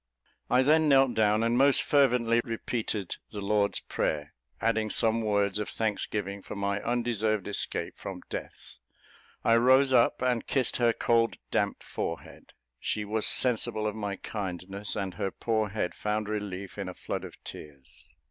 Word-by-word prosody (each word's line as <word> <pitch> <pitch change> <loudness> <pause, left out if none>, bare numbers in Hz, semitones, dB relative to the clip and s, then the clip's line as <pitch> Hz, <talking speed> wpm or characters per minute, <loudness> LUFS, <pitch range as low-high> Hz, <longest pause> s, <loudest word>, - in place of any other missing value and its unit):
I 125 +1 +4
then 155 +2 +4
knelt 135 -2 +5
down 110 0 +3
and 115 +1 +2
most 135 +2 +5
fervently 125 -5 +3
repeated 115 -4 -3
the 105 - -6
Lord's 100 0 +1
Prayer, 75 -1 -2 0.3
adding 110 -1 +1
some 115 +1 +2
words 100 -2 +1
of 105 - -3
thanksgiving, 105 -2 -2
for - - -8
my 100 0 -1
undeserved 110 -4 0
escape 100 - -2
from - - -7
death. - - -8 0.6
I 115 - +5
rose 130 +3 +5
up 120 0 +4
and 125 -2 0
kissed 130 -3 0
her 120 -1 +4
cold, 115 0 +1
damp - - 0
forehead; - - -6 0.3
she 105 - -2
was 110 +1 +1
sensible 110 -3 +1
of 105 - 0
my 100 -2 -3
kindness, 95 0 -5
and 95 -2 -3
her 100 - -2
poor 110 +1 -1
head 95 -3 -2
found 105 0 -2
relief 100 -3 -5
in - - -3
a - - -8
flood - - -4
of - - -9
tears. 70 -3 -12
110 Hz, 155 wpm, -29 LUFS, 100-120 Hz, 0.6 s, knelt